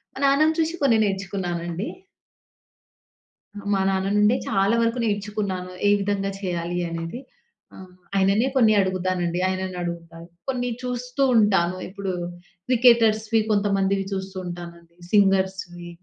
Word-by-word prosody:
మా - - -7
నాన్నని 295 +3 +4
చూసి 325 +1 +1
కొన్ని 255 -5 +4
నేర్చుకున్నానండి. 185 -2 -3 1.7
ఆహ్, 205 - -9
మా 195 - +2
నాన్న 190 0 0
నుండే 210 +3 +4
చాలా 200 +2 +2
వరకు 230 +2 0
నేర్చుకున్నాను. 205 -3 -2 0.2
ఏ - - +5
విధంగా 195 0 -1
చేయాలి 175 -2 -3
అనేది. 165 +6 -5 0.6
ఆహ్, 185 -1 -11 0.3
ఆయననే 195 +5 +3
కొన్ని 225 -5 +5
అడుగుతానండి, 185 -2 -1
ఆయననడుగుతాను. 175 -3 -5 0.2
కొన్ని 245 -1 -1
చూస్తూ 250 +2 -2
ఉంటాను 190 -5 +3
ఇప్పుడు 195 0 -4 0.5
క్రికెటర్స్‌వి 225 -3 +4
కొంతమందివి 195 -1 +1
చూస్తూ 190 0 -5
ఉంటానండి. 170 -1 -9 0.2
సింగర్స్‌వి 190 -3 +1
195 Hz, 110 wpm, -24 LUFS, 180-220 Hz, 1.7 s, ఏ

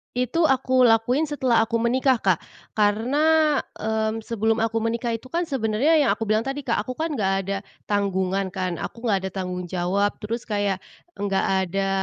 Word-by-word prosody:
Itu 250 +7 +2
aku 260 -2 +3
lakuin 240 +7 +2
setelah 260 -6 +2
aku 230 - -2
menikah, 255 +3 +3
Kak. 185 -4 +2 0.4
Karena, 290 +9 +3 0.2
mmm, 220 0 -2
sebelum 225 0 0
aku 225 0 0
menikah 230 +1 -1
itu 230 +3 -9
kan 340 +6 -1
sebenarnya 270 +2 +2
yang - - +3
aku - - -4
bilang 215 +1 +1
tadi, 275 +1 -3
Kak, 240 -3 0
aku 255 +5 -4
kan 320 +3 -2
nggak 195 -5 +1
ada 195 +1 -2 0.3
tanggungan 195 -1 0
kan, 180 -3 -3
aku 235 - -7
nggak 195 -3 +1
ada - - -4
tanggung 180 -1 -4
jawab 185 +4 0
terus 230 +3 -4
kayak 205 -3 0 0.4
nggak 200 -1 0 0.3
ada, 195 0 0
225 Hz, 175 wpm, -24 LUFS, 200-255 Hz, 0.4 s, aku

